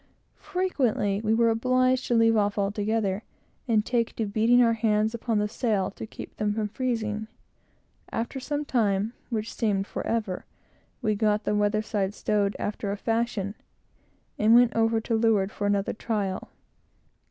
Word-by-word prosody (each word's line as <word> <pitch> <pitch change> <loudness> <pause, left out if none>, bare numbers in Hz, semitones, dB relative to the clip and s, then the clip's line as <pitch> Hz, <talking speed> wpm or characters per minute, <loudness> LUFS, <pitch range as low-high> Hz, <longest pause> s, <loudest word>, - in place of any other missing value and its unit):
Frequently 250 - 0
we 220 0 +2
were 230 0 +4
obliged 255 +2 +2
to 240 - +2
leave 225 0 +4
off 205 -1 +1
altogether 205 0 0 0.5
and 220 -3 +2
take 235 -2 0
to 225 - -1
beating 225 +4 +3
our 230 -1 +4
hands 215 -1 +1
upon 230 -1 -1
the 210 0 +1
sail, 210 -3 0
to 220 - -8
keep - - -10
them 210 -1 0
from 215 -1 -1
freezing. 220 -3 -2 0.8
After 235 +4 -3
some 295 +3 -3
time, 215 -4 +1 0.2
which 220 -2 -3
seemed 200 -3 0
forever, 210 -4 -3 0.6
we 215 -2 +2
got 210 0 +1
the - - 0
weather 210 +1 +1
side 205 -2 -2
stowed 205 -1 0
after 205 -1 -3
a 205 - -3
fashion, 225 -2 -1 0.9
and 220 +2 +6
went 240 -2 +5
over 225 0 +2
to 230 - -3
leeward 220 -3 +2
for 205 - -2
another 200 -1 +1
trial. 205 -4 -3
220 Hz, 155 wpm, -26 LUFS, 205-230 Hz, 0.9 s, and